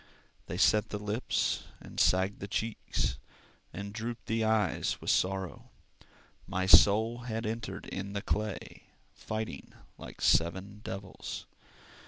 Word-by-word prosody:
They - - -4
set 105 -1 +4
the 105 - -3
lips, 105 +4 -1
and - - -8
sagged 95 +2 +3
the 100 - -5
cheeks, 105 - -1 0.5
And 100 +1 -6
drooped 115 +2 -5
the 110 0 0
eye 110 -5 +2 0.2
with - - 0
sorrow. 95 -1 0 0.8
My 95 0 -1
soul 110 +5 +7
had 115 -2 -3
entered 110 +1 -4
in 100 +1 -5
the 100 - -3
clay, 105 -2 -3 0.3
Fighting 110 -10 -5 0.3
like - - -10
seven 95 +5 +2
devils. 95 -1 -6
105 Hz, 125 wpm, -31 LUFS, 95-110 Hz, 0.8 s, soul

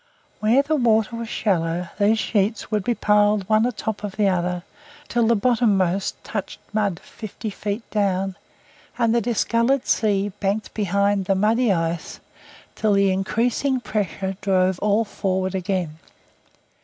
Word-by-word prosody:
Where 235 +6 +3
the 310 +2 0
water 225 -3 +2
was 230 -1 -5
shallow 175 -3 -1
these 210 +2 +4
sheets 210 +1 -1
would 210 -2 0
be 240 +2 0
piled 210 -2 +2
one 220 +2 +3
atop 220 -3 -4
of 205 -2 -4
the 210 -2 +2
other 180 -1 0 0.4
till 235 -2 +1
the 235 - +4
bottommost 200 -5 +1
touched 210 -3 -5
mud 200 -5 0
fifty 215 0 -7
feet 205 +3 -4
down, 195 -2 0 0.6
and 230 -2 +2
the 235 - +3
discoloured 235 +3 +1
sea 205 -2 +1
banked 205 +2 -2
behind 200 -1 +1
the 195 - +2
muddy 220 +4 +2
ice 165 -2 -2 0.5
till 215 -2 +1
the 200 -1 +3
increasing 235 +7 0
pressure 195 -4 -3
drove 185 -1 +2
all 210 +2 +2
forward 190 -2 -2
again. 180 -4 -2
205 Hz, 145 wpm, -22 LUFS, 190-225 Hz, 0.6 s, these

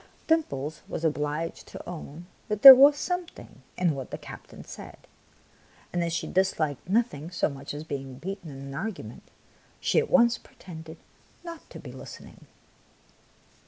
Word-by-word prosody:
Dimples 155 - 0
was 165 - -4
obliged 150 +1 -2
to - - -10
own 170 -1 -8 0.2
that 210 -1 -3
there 270 - +16
was 280 +3 +7
something 355 +2 -5 0.2
in 175 -3 +2
what 135 -2 -6
the - - -5
captain - - -11
said; - - -10 1.0
and 175 -1 0
as 170 - -2
she 170 - -2
disliked 165 -5 -1
nothing 195 - 0
so 180 - 0
much 140 -1 -7
as 145 +1 -6
being 135 -4 -6
beaten 180 +4 -7
in 135 -1 -9
an 140 0 -8
argument, 145 - -6 0.5
she - - +2
at 465 - -2
once 235 -3 +4
pretended 160 -3 -12 0.5
not 335 -2 -9
to - - -10
be - - -10
listening. - - -12
170 Hz, 155 wpm, -27 LUFS, 145-225 Hz, 1.0 s, there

